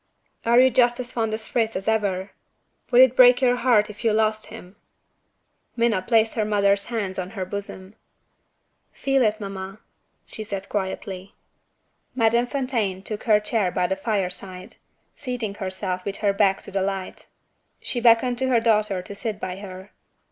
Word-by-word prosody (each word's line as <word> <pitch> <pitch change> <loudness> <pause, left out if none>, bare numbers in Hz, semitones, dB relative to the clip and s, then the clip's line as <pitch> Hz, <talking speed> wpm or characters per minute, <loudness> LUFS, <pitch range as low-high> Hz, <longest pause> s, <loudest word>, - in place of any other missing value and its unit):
"Are 235 +1 +5
you 260 0 +6
just 240 0 +3
as 245 -1 -5
fond 225 -2 -1
of 220 +1 -3
Fritz 225 0 -1
as 190 +2 -4
ever? 200 -3 0 0.6
would 245 0 +6
it 260 -1 +6
break 245 -1 +7
your 250 -1 +2
heart 235 -4 +3
if 210 +2 -11
you 225 - +3
lost 215 0 0
him?" 205 -3 -12 1.0
Minna 230 -5 +1
placed 225 +2 +2
her 220 - 0
mother's 200 -1 +2
hand 205 -6 -3
on 185 0 -4
her 185 - -2
bosom. 195 0 -7 1.0
"Feel 270 -1 +1
it, 215 -2 +1
mamma," 195 -1 -7 0.5
she 220 - -8
said 200 -2 -6
quietly. 190 -1 -5 0.8
Madame 235 0 +2
Fontaine 235 -8 -2
took 215 +2 -5
her 215 -3 +5
chair 210 -2 0
by 180 0 0
the 190 +2 -1
fire 195 -2 -1
side 185 0 -7 0.4
seating 245 -6 -4
herself 185 -2 -3
with 200 +1 -4
her 200 - +3
back 195 -1 +2
to - - -8
the 195 0 -1
light. 195 -1 -4 0.5
She 245 - -4
beckoned 240 +1 +4
to 260 - 0
her 245 -3 +3
daughter 215 -4 +1
to 200 - -8
sit 210 0 -4
by 185 -2 -5
her. 190 0 -10
210 Hz, 170 wpm, -23 LUFS, 195-235 Hz, 1.0 s, break